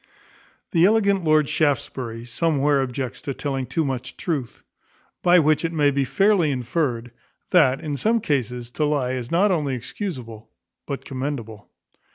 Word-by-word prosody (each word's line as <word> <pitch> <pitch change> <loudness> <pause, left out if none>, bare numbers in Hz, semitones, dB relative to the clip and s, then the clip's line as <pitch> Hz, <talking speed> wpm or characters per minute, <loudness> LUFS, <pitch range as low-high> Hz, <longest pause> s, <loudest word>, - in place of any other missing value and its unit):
The 170 -1 +3
elegant 200 -2 +3
Lord 155 -2 +3
Shaftesbury 125 -6 -1
somewhere 145 +1 +1
objects 130 -1 -4
to 140 -3 -4
telling 135 -3 -3
too 155 +6 0
much 130 -2 -4
truth: 145 -9 -4 0.6
by 175 0 +5
which 155 -1 +3
it 165 - -1
may 145 -3 +3
be 140 0 0
fairly 195 - +3
inferred, 125 -2 -2 0.4
that, 135 -7 +4
in 150 -2 -4
some 225 +10 +2
cases, 125 - -2
to 150 - 0
lie 145 -4 0
is 125 -2 -4
not 190 +5 +3
only 150 -7 0
excusable 125 - -6 0.4
but 140 -2 -5
commendable. 130 -6 -5
140 Hz, 150 wpm, -23 LUFS, 125-165 Hz, 0.6 s, by